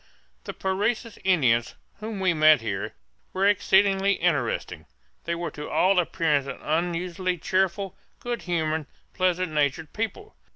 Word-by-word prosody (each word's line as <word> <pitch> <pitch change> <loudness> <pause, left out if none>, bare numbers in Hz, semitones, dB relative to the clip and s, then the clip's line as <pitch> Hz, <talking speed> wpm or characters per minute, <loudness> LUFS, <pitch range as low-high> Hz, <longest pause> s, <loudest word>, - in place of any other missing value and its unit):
The - - -5
Parecis 210 +4 -1
Indians, 130 -11 +2 0.2
whom 215 -1 -5
we 185 -2 +2
met 155 -3 +5
here, 100 -4 -4 0.4
were 190 +1 +1
exceedingly 195 0 +3
interesting. 145 -11 -1 0.4
They 170 - -1
were 170 0 -4
to 150 - -7
all 185 +1 +3
appearance 160 -5 +1
an 135 - -5
unusually 175 +3 -1
cheerful, 190 +2 -1 0.2
good 240 -1 -4
humored, 160 -3 -1 0.3
pleasant 185 -2 0
natured 150 +1 -1
people. 405 - -4
180 Hz, 130 wpm, -25 LUFS, 155-195 Hz, 0.4 s, met